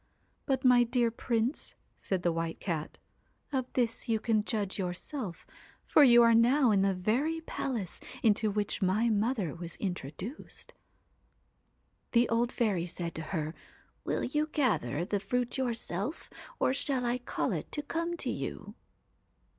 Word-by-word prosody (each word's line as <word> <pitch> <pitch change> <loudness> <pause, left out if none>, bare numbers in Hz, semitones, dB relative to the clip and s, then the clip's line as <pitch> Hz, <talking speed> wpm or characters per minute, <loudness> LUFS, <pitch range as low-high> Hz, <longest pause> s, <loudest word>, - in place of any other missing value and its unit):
But 265 -2 0
my 250 -1 +7
dear 240 -1 +1
Prince,' 235 +3 -2 0.2
said 185 -2 -2
the 175 - +3
White 165 0 -3
Cat, 160 -5 -3 0.6
'of 260 -2 -1
this 240 0 0
you 220 -1 +2
can 215 -1 +1
judge 205 -3 -2
yourself, 185 - -4 0.4
for 300 - +6
you 240 -3 +8
are 230 0 +6
now 245 +2 +5
in 200 -2 +4
the 195 -1 +2
very 255 - 0
palace 235 - -4 0.2
into 215 0 +3
which 205 0 -1
my 200 +5 +2
mother 210 - 0
was 170 0 -8
introduced. 185 - -6 1.4
'The 240 0 +5
old 235 +1 +1
fairy 200 -8 0
said 170 -1 -4
to 160 - -5
her: 155 -4 -2 0.5
"Will - - -1
you 300 +4 0
gather 190 - 0
the 205 +2 -1
fruit 245 +6 -1
yourself, 235 - -3 0.3
or - - +2
shall 270 -2 -1
I 240 +1 0
call 245 - -2
it - - -4
to 295 - -2
come 335 +3 -2
to - - -1
you - - -5
230 Hz, 150 wpm, -31 LUFS, 190-255 Hz, 1.4 s, you